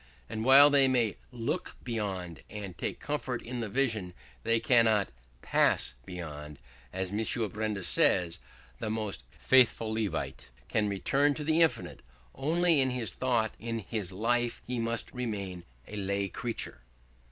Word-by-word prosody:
And 110 +9 -4
while 140 +3 +8
they 140 -2 +5
may 120 -5 +1
look 125 +9 -3
beyond, 95 -8 -4
and 100 -4 -7
take - - -4
comfort 130 -4 -3
in 125 +1 -5
the 115 -3 -3
vision, 110 -7 0 0.3
they 115 0 +2
cannot 115 -5 +4 0.3
pass - - +2
beyond. 75 -4 -7 0.3
As 95 -1 -3
M. 105 +2 -1 0.3
Benda 105 -2 -2
says, 90 -1 +3 0.4
the 110 - -3
most 110 -2 -2
faithful 115 -4 +3
Levite 110 -2 -3 0.2
can 105 -1 +1
return 140 +9 +2
to 150 - -4
the 160 +2 +2
infinite 165 - +1 0.3
only 160 +2 +3
in 130 - +2
his 120 -7 -1
thought; 120 -4 +1
in 115 0 -3
his 100 -2 -3
life 120 +4 0
he 125 -1 -3
must 115 0 -2
remain 100 -8 -4 0.2
a 105 - -8
lay 100 0 -1
creature. 115 - -4
115 Hz, 145 wpm, -30 LUFS, 100-125 Hz, 0.4 s, while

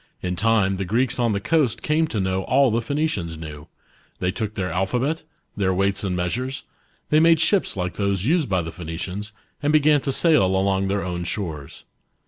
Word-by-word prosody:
In 90 - -1
1 - - -2
time 100 -1 +2
the 95 - -2
Greeks 120 +8 0
on 120 -2 +2
the 100 - 0
coast 140 -1 +1
came 155 +1 +2
to 110 - -3
know 95 0 0
all 140 -3 +3
the 115 +2 +1
Phoenicians 115 - -2
knew: 75 -2 -9 0.5
they 90 - -1
took 110 +2 -4
their 90 -2 -2
alphabet, 125 +11 -1 0.3
.their 95 -2 +1
weights 100 +1 0
and 95 -2 -1
measures; 125 +10 -2 0.5
they 155 - +5
made 165 0 +5
ships 190 - +2
like 90 -1 -3
those 100 -1 0
used 155 -2 +2
by 95 -3 +1
the 80 - -6
Phoenicians, 90 +5 -6 0.3
and 145 0 +1
began 150 -1 +4
to 135 - -1
sail 160 - +4
along 95 +1 +1
their 100 +1 -1
own 90 -1 -3
shores. 80 -6 -5
100 Hz, 195 wpm, -23 LUFS, 90-135 Hz, 0.5 s, they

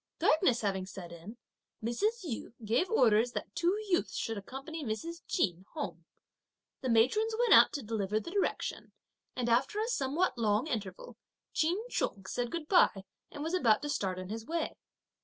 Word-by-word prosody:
Darkness 305 -7 +3
having 190 -3 -1
set 180 -3 -9
in, 170 +7 -10 0.5
Mrs. 410 - 0
Yu 240 -6 -5
gave 235 - +2
orders 240 - +4
that - - -5
two 350 +4 +1
youths 360 -2 +1
should 225 - -2
accompany 270 +10 -7
Mr. 325 +9 -4
Ch'in 185 - 0
home. 295 - -5 0.8
The 260 - -2
matrons 345 - +3
went 485 -1 +5
out - - +8
to 285 - -3
deliver 210 -1 -1
the 335 - -8
directions, 400 0 -1 0.5
and 245 -2 -1
after 255 - +2
a 440 - 0
somewhat 295 - 0
long 215 +2 +2
interval, 210 - -5 0.4
Ch'in 330 +4 +2
Chung 195 -1 -2
said 240 +5 -2
goodbye 310 - +3 0.3
and 290 - -7
was 325 +3 -3
about 235 -12 +3
to 295 - -3
start 190 -9 -1
on 185 0 -6
his 220 +1 -4
way. 330 +5 -2
245 Hz, 165 wpm, -32 LUFS, 215-335 Hz, 0.8 s, out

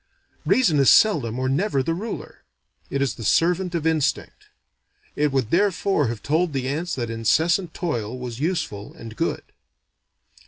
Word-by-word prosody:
Reason 175 - +3
is 135 - +5
seldom 135 - +4
or 130 0 -1
never 140 +1 0
the 165 - -1
ruler: 210 +6 -6 0.5
it 140 0 0
is 140 - -1
the 115 - -9
servant 175 - +1
of 165 -2 -2
instinct. 160 -3 -1 0.7
It 150 0 +1
would 130 -4 -1
therefore 195 -5 +2
have 115 -2 -5
told 160 +2 0
the 130 -2 -2
ants 160 +6 -2
that 120 -3 -3
incessant 160 - +1
toil 125 - -3
was 125 -2 -6
useful 140 - -3
and 115 -1 -10
good. - - -2
145 Hz, 155 wpm, -23 LUFS, 125-175 Hz, 0.7 s, is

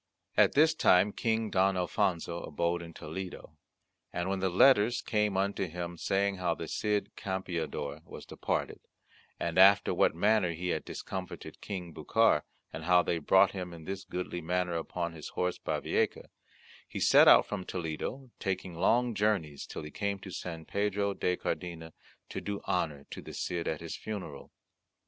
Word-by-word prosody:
At - - +5
this 160 +3 +5
time 100 - +4
King 110 -2 0
Don 95 0 +3
Alfonso 85 -1 0
abode 85 +3 -1
in 85 -1 -9
Toledo, 80 0 -7 0.6
and 85 +1 -2
when 95 0 -1
the 95 0 +1
letters 120 +4 +5
came 105 -3 0
unto 100 0 0
him 85 +1 -5
saying 100 +3 0
how 90 -2 0
the 80 - -6
Cid 105 +4 -1
Campeador 85 -6 -4
was - - -10
departed, - - -3 0.6
and 85 +1 0
after 100 +1 +7
what - - +3
manner 90 -1 +3
he 90 +2 -4
had 80 - -1
discomfited 95 -1 -7
King 90 -4 -6
Bucar, - - +3 0.3
and 80 +2 -6
how 90 0 +5
they 85 - 0
brought 95 +5 +5
him 90 -2 -6
in 80 - -11
this 95 +3 -5
goodly 90 -1 -4
manner 90 +1 -1
upon 85 +1 -3
his 80 -2 -8
horse 90 0 -2
Bavieca, - - -1 0.6
he - - -6
set - - +6
out - - +8
from 100 -3 -4
Toledo, 90 - -5
taking 95 -2 -3
long 120 +8 +2
journeys 100 -9 0
till - - -6
he 75 - -8
came 100 0 -2
to 95 - -8
San 85 -3 -6
Pedro 100 +1 0
de 90 -2 0
Cardena 80 -3 -4 0.4
to - - -5
do 100 -1 -3
honour 75 -6 -1
to - - -6
the - - -9
Cid 85 -1 -2
at 80 - -2
his 85 -1 -5
funeral. 95 -10 -7
90 Hz, 170 wpm, -31 LUFS, 85-100 Hz, 0.6 s, out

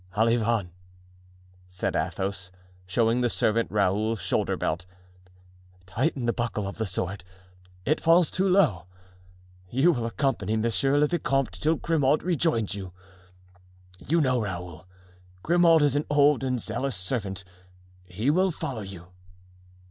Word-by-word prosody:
"Olivain," 115 -4 +1 1.0
said 90 0 -3
Athos, 95 -1 -3 0.4
showing 115 +5 +1
the 120 - +2
servant 115 +1 +1
Raoul's 105 +2 +1
shoulder 90 0 -1
belt, 85 +3 -2 1.0
"tighten 130 - -1
the 120 - +1
buckle 115 -4 -2
of 100 - -7
the 110 - -1
sword, 95 0 -3 0.6
it 155 - +1
falls 165 +1 +4
too 190 +1 +1
low. 145 - +2 0.8
You 135 - +3
will 120 -7 -2
accompany 115 -5 -1
monsieur 115 +5 +1
le 150 - +4
vicomte 135 -5 0
till 160 +2 +1
Grimaud 150 -3 +1
rejoins 160 - 0
you. 95 -3 -7 1.1
You 165 +3 +1
know, 130 -4 +1
Raoul, 85 -4 -6 0.6
Grimaud 170 -2 +4
is 145 -2 +2
an 145 - -1
old 145 -1 +4
and 130 -2 -1
zealous 120 +4 -3
servant; 95 0 -3 0.6
he 105 +10 -1
will 185 +4 +2
follow 130 -8 -5
you." 95 -3 -9
115 Hz, 130 wpm, -26 LUFS, 100-145 Hz, 1.1 s, falls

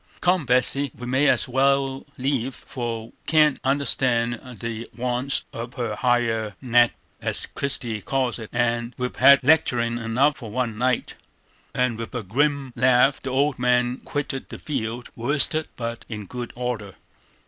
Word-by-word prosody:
Come, 180 -5 +2
Betsey, 125 +3 +2
we 125 - -7
may 130 +4 +2
as - - +2
wal 135 +1 +1
leave, 130 -1 -1
for 115 -3 -5
we - - -24
can't 155 -2 +4
understand 125 -4 +1 0.2
the 115 0 -5
wants 125 +2 -1
of 120 +2 -6
her 120 -5 -2
higher 115 -3 +1
nater, 120 -2 +3 0.3
as - - 0
Christie 120 -6 -2
calls 130 +1 -1
it, 110 - -8
and 120 0 0
we've 125 0 -3
had 140 +1 +7
lecterin' 120 -6 +3
enough 125 +5 +2
for 115 -4 -8
one 120 0 -2
night." 125 +2 0 0.6
And 125 -3 +1
with 115 +2 -6
a 120 - -2
grim 140 +5 0
laugh 125 +2 +4
the 135 - -4
old 140 +1 +1
man 125 0 +2
quitted 145 -2 -4
the - - -7
field, 120 -4 -4
worsted 145 +5 +2
but 115 -1 -5
in 105 -3 -6
good 120 +3 -6
order. 120 -5 -4
125 Hz, 155 wpm, -24 LUFS, 115-135 Hz, 0.6 s, had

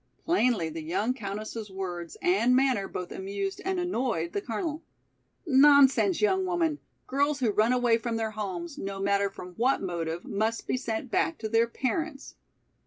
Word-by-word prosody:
Plainly 245 - +2
the 160 +1 -6
young 185 +10 0
countess's 215 -1 -6
words 180 -3 -5
and 355 -9 +3
manner 255 -7 +2
both 180 -1 -6
amused 195 0 -4
and 380 -1 -1
annoyed 240 - -1
the 200 - -1
Colonel. 295 - -3 0.6
"Nonsense, 285 +4 +5
young 380 -2 +3
woman, 340 -5 0 0.3
girls 285 +2 +1
who 240 -5 +2
run 215 +3 +3
away 245 -2 +3
from 230 0 -3
their 225 -1 -1
homes 185 -5 -5
no 195 0 -4
matter 200 0 +1
from 180 -2 -10
what 255 +4 +2
motive, 170 -2 -3
must 220 +3 -1
be - - 0
sent 235 -1 -3
back 330 - +1
to 220 - -4
their 230 +1 +3
parents. 275 +5 -3
230 Hz, 165 wpm, -28 LUFS, 195-275 Hz, 0.6 s, Nonsense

